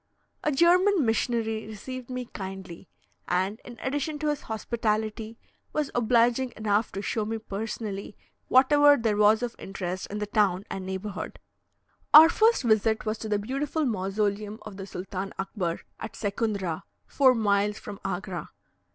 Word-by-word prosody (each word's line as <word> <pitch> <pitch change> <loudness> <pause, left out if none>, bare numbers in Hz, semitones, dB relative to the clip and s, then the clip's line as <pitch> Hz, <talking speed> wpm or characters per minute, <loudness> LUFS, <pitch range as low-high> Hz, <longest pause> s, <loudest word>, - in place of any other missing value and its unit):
A 300 - +2
German 350 +3 +4
missionary 225 -1 0
received 250 +4 -7
me 250 -1 -4
kindly; 190 -4 -8 0.4
and, 190 +5 0
in 240 -1 -11
addition 290 +3 -2
to 300 0 -1
his 295 -1 -1
hospitality, 220 0 -2 0.4
was 300 -2 -1
obliging 240 +2 +2
enough 215 0 +1
to 195 - -4
show 220 - -1
me 225 +2 -2
personally 210 -1 -5 0.3
whatever 290 +2 +6
there 225 -3 +1
was 210 +2 +4
of 240 -1 -3
interest 185 -1 -5
in 210 - -4
the 210 - -2
town 205 -2 +1
and 190 -1 -5
neighbourhood. 190 +1 -5 0.8
Our 315 +2 +11
first 445 0 +3
visit 220 -1 +2
was 215 0 -2
to 220 - -5
the 210 - +2
beautiful 275 +8 -2
mausoleum 205 -1 -1
of 215 -2 -9
the 195 -1 -7
Sultan 190 +1 -5
Akbar, 190 -3 -3 0.2
at 220 - -6
Secundra, 200 -5 -2 0.2
four 260 -3 +4
miles 205 -1 +1
from 205 -2 -8
Agra. 180 -3 -4
215 Hz, 150 wpm, -27 LUFS, 200-245 Hz, 0.8 s, Our